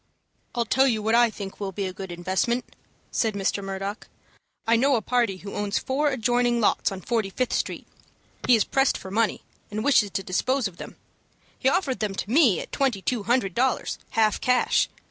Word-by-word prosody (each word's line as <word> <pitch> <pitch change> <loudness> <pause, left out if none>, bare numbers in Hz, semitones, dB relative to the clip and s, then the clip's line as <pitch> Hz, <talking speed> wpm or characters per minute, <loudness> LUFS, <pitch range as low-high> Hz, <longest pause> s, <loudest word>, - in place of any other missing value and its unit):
"I'll 235 -1 +1
tell 265 +4 +3
you 220 -4 0
what 220 +1 +1
I 240 0 +5
think 200 -3 -8
will 200 -2 -3
be 195 +1 -3
a 185 - -4
good 190 -1 -7
investment," 185 +8 -1 0.4
said 220 -3 0
Mr. 200 0 -1
Murdock. 195 +2 -5 0.6
"I 230 - +4
know 270 +4 +3
a 230 - 0
party 235 -6 +1
who 200 +2 -9
owns 205 -1 -1
four 290 +3 0
adjoining 245 -1 +1
lots 215 - +2
on 190 -1 -6
Forty 225 -1 -1
Fifth 250 +5 -2
Street. - - -2 0.6
He 250 - +7
is 220 - +3
pressed 270 0 +1
for 190 - -9
money, 220 +1 0 0.3
and 215 +1 -3
wishes 255 -7 +4
to 195 - -3
dispose 250 +7 0
of 180 -3 -12
them. - - -9 0.6
He 265 - +3
offered 280 -6 0
them 210 -3 -2
to 200 - -4
me 250 - +5
at - - -10
twenty 250 -9 0
two 245 -4 0
hundred 240 -7 +2
dollars, 255 +4 0
half 215 -2 +2
cash. 250 0 +2
225 Hz, 200 wpm, -25 LUFS, 195-250 Hz, 0.6 s, He